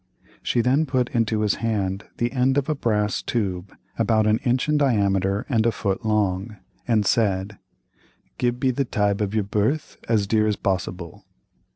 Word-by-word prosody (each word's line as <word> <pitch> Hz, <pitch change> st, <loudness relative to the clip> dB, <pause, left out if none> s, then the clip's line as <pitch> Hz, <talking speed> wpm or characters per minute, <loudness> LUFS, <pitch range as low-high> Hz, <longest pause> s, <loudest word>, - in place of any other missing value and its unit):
She 120 Hz, -, +1 dB
then 135 Hz, +6 st, +2 dB
put 130 Hz, -2 st, 0 dB
into 115 Hz, -4 st, 0 dB
his 105 Hz, -1 st, +2 dB
hand 100 Hz, -4 st, -1 dB
the 120 Hz, 0 st, 0 dB
end 130 Hz, +1 st, +1 dB
of 140 Hz, -, +1 dB
a 155 Hz, -, +1 dB
brass 105 Hz, -6 st, 0 dB
tube 95 Hz, -5 st, -3 dB, 0.3 s
about 110 Hz, -2 st, +2 dB
an 110 Hz, +1 st, +3 dB
inch 125 Hz, +1 st, 0 dB
in 150 Hz, -, +2 dB
diameter 100 Hz, -8 st, +1 dB
and 115 Hz, -6 st, +2 dB
a 115 Hz, -, +2 dB
foot 100 Hz, -1 st, -2 dB
long, 105 Hz, -1 st, 0 dB, 0.3 s
and 110 Hz, -4 st, +2 dB
said: 100 Hz, -3 st, 0 dB, 0.8 s
"Give 120 Hz, 0 st, 0 dB
be 130 Hz, -1 st, +2 dB
the 140 Hz, +3 st, 0 dB
tibe 105 Hz, -5 st, 0 dB
of 105 Hz, +1 st, -1 dB
your 110 Hz, -, +2 dB
birth 105 Hz, +9 st, -1 dB
as 110 Hz, -3 st, +2 dB
dear 110 Hz, +1 st, +2 dB
as 105 Hz, -, +1 dB
possible." 90 Hz, -3 st, -4 dB
110 Hz, 175 wpm, -23 LUFS, 100-120 Hz, 0.8 s, an